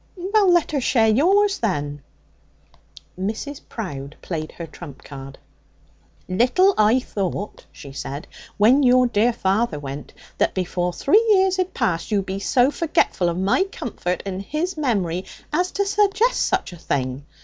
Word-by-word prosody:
'Well, 390 +1 +2
let 345 -3 +3
her 285 -3 0
share 225 -3 +3
yours, 390 - +3
then.' 145 -8 -2 1.2
Mrs. 220 +9 -4
Prowde 145 - -6
played 155 -3 -4
her 170 - -7
trump 150 -4 -11
card. 135 -1 -10 0.9
'Little 250 - +3
I 215 +4 +4
thought,' 200 -3 -4
she 140 - -11
said, 140 +1 -6 0.3
'when 235 +7 +5
your 255 -1 +5
dear 235 0 +2
father 200 -4 0
went, 140 0 -7 0.3
that - - +1
before 180 -1 -1
three 320 - +3
years 380 -2 +4
had 370 0 -2
passed 180 -9 -1
you'd 200 -3 0
be 190 +1 -4
so 250 +6 +3
forgetful 295 - +1
of 170 - -3
my 195 - +2
comfort 210 - -4
(and 190 -1 -4
his 315 - -3
memory) 195 - -1 0.3
as 360 +4 +1
to 400 - 0
suggest 415 +4 +2
such - - -1
a - - -10
thing. 135 -4 -2
215 Hz, 150 wpm, -22 LUFS, -, 1.2 s, when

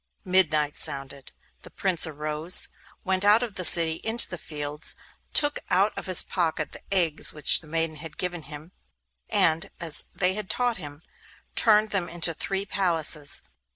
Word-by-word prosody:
Midnight 155 -6 +1
sounded. 135 0 -3 0.3
The - - -12
Prince 180 -3 +1
arose, 155 +3 -1 0.3
went 190 0 -1
out 210 +4 +4
of 230 -4 -6
the 185 - -6
city 165 -1 +5
into 225 +1 +1
the 175 - -8
fields, 150 0 -2 0.4
took 290 -1 +3
out 195 +4 +1
of - - -8
his 185 -2 +5
pocket 160 -4 -3
the - - -12
eggs 170 -6 +2
which 150 -2 +4
the 160 - -16
maidens 165 -1 -2
had 160 0 -9
given 175 -2 -4
him, 150 +3 -10 0.6
and, 165 +4 +1
as 165 -3 -3
they 185 0 +1
had 210 -1 -6
taught 245 -2 0
him, 145 -2 -11 0.5
turned 215 -1 +3
them 180 -4 -1
into 170 0 +1
three 195 +5 -4
palaces. 165 -7 +2
170 Hz, 160 wpm, -24 LUFS, 155-190 Hz, 0.6 s, city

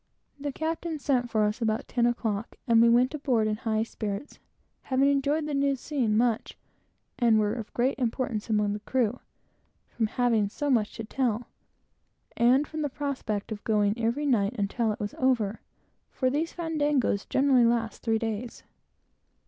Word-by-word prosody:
The 285 0 -3
captain 320 +2 -3
sent 260 -4 0
for 215 -2 +2
us 210 +3 -1
about 220 -1 0
ten 240 -1 +2
o'clock, 225 -3 -2
and 230 -1 +5
we 235 - +6
went 245 +4 +4
aboard 260 -7 +1
in 215 0 -1
high 220 -1 0
spirits, 215 +2 -5 0.4
having 265 +1 +2
enjoyed 285 +2 +1
the 300 - -3
new 280 0 +2
scene 245 -5 -1
much, 235 -1 0 0.6
and 230 -3 +4
were 210 0 +1
of 225 -3 -6
great 255 +3 +1
importance 235 -2 -2
among 210 -1 +1
the 210 - -4
crew, 245 +1 0 0.7
from 225 -2 -1
having 225 -3 +1
so 290 +6 -2
much 220 -4 +1
to 225 - -5
tell, 235 0 -1 0.9
and 255 +5 +4
from 310 0 -5
the 295 - -1
prospect 255 -8 -3
of 210 -1 -5
going 210 -2 +2
every 235 +5 -1
night 230 -5 +2
until 215 +2 0
it 210 - -5
was 205 0 -4
over; 230 -5 +1 0.5
for 255 -1 0
these 315 +4 -1
fandangos 295 - 0
generally 265 -2 +4
last 230 -1 0
three 225 -1 +1
days. 225 +1 -4
235 Hz, 165 wpm, -27 LUFS, 220-275 Hz, 0.9 s, we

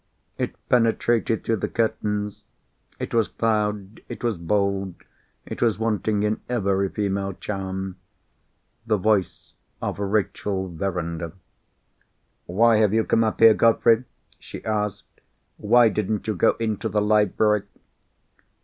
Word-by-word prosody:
It - - -2
penetrated 115 -1 +2
through 115 - 0
the - - -2
curtains; 105 -2 -2 0.6
it - - -5
was 115 -2 +2
loud, 105 -2 -1
it - - -8
was 115 -7 -1
bold, 100 +1 -1 0.5
it - - -7
was 115 -5 +2
wanting 110 -1 0
in 105 +1 -1
every 100 -5 0
female 100 -1 -2
charm. 95 -1 -5 0.9
The 110 -2 +2
voice 100 -1 0 0.3
of - - -4
Rachel 100 -1 -1
Verinder. 85 -2 -4 1.1
"Why 110 +5 +4
have 105 -1 +3
you 110 - +3
come 115 - +2
up 110 0 -2
here, 115 -1 +9
Godfrey?" 115 +2 +3 0.3
she - - -10
asked. 105 -2 -3 0.4
"Why 120 +3 +5
didn't 105 -1 -1
you 110 - -1
go 90 - +2
into 110 0 -2
the 105 +1 +1
library?" 105 0 +2
105 Hz, 125 wpm, -24 LUFS, 95-110 Hz, 1.1 s, here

